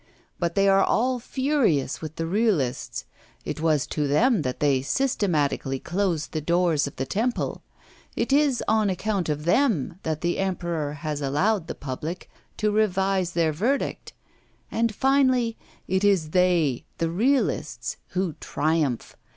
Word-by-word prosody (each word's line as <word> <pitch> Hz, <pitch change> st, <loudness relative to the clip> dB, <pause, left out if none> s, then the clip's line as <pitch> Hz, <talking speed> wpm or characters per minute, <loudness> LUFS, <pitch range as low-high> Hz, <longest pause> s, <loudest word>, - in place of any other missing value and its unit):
But 170 Hz, -1 st, -1 dB
they 195 Hz, 0 st, +4 dB
are 195 Hz, 0 st, +5 dB
all 250 Hz, +2 st, +1 dB
furious 250 Hz, -, 0 dB
with 155 Hz, -1 st, -6 dB
the 165 Hz, -, -2 dB
realists. 175 Hz, -, 0 dB, 0.4 s
It -, -, -4 dB
was 155 Hz, -4 st, +2 dB
to 150 Hz, -2 st, -2 dB
them 215 Hz, -, +3 dB
that 125 Hz, -3 st, -3 dB
they 140 Hz, -3 st, +2 dB
systematically 155 Hz, -, 0 dB
closed 175 Hz, -1 st, -1 dB
the 155 Hz, -, -2 dB
doors 170 Hz, -2 st, +2 dB
of 140 Hz, -, -8 dB
the 130 Hz, -, -2 dB
temple; 235 Hz, -, -1 dB, 0.5 s
it 235 Hz, +4 st, 0 dB
is 280 Hz, -3 st, +3 dB
on 215 Hz, -2 st, +3 dB
account 190 Hz, -2 st, -1 dB
of 150 Hz, 0 st, -2 dB
them 190 Hz, -, +1 dB
that 155 Hz, -1 st, -3 dB
the 175 Hz, 0 st, 0 dB
Emperor 175 Hz, -6 st, -2 dB
has 150 Hz, 0 st, -4 dB
allowed 165 Hz, +7 st, +1 dB
the -, -, -5 dB
public 150 Hz, +6 st, -6 dB, 0.3 s
to 210 Hz, -1 st, +1 dB
revise 195 Hz, -3 st, +1 dB
their 160 Hz, -2 st, +1 dB
verdict; 235 Hz, -, -1 dB, 0.6 s
and 230 Hz, 0 st, +1 dB
finally 260 Hz, -3 st, +3 dB, 0.3 s
it 190 Hz, +2 st, 0 dB
is 190 Hz, -7 st, +2 dB
they, 175 Hz, -8 st, +2 dB
the 165 Hz, -1 st, -1 dB
realists, 250 Hz, +10 st, 0 dB, 0.2 s
who 185 Hz, -3 st, 0 dB
triumph. 150 Hz, -5 st, -1 dB
180 Hz, 145 wpm, -25 LUFS, 155-220 Hz, 0.6 s, are